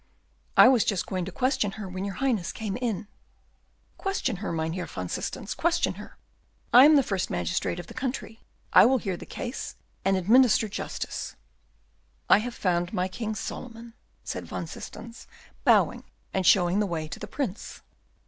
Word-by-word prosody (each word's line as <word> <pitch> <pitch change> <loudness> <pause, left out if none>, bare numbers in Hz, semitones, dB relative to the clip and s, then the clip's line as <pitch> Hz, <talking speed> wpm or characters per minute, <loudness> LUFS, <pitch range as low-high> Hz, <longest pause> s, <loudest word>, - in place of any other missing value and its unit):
"I - - +10
was 250 -4 +5
just 200 -5 0
going 185 -3 -3
to 190 - -6
question 255 -2 0
her 210 -2 -6
when 185 +1 -5
your 200 -1 -4
Highness 230 -9 0
came 215 -4 -4
in." 225 -4 -2 0.9
"Question 385 - -1
her, 195 - -4
Mynheer 165 +2 -2
van 90 -1 -5
Systens, - - -4
question - - +1
her. - - -13 0.6
I 250 +3 +10
am 305 +1 +7
the 280 - +5
first 195 -5 -2
magistrate 90 - -1
of 175 - -7
the - - -11
country; 255 -3 -4 0.3
I - - +9
will 265 +1 +4
hear 195 -7 -3
the - - -10
case 250 +1 -5 0.3
and 195 0 +2
administer 225 +4 +5
justice." 205 - -5 1.0
"I - - +8
have 240 +2 -5
found 175 -2 0
my 180 0 0
King 215 +3 -4
Solomon," 230 +1 -7 0.3
said - - -5
Van - - -4
Systens, 230 0 -10 0.4
bowing, - - +4 0.3
and 190 -2 +1
showing 180 0 +5
the 210 - +1
way 160 -3 -3
to 140 - -8
the - - -6
Prince. 245 -9 -5
205 Hz, 170 wpm, -27 LUFS, 180-245 Hz, 1.0 s, I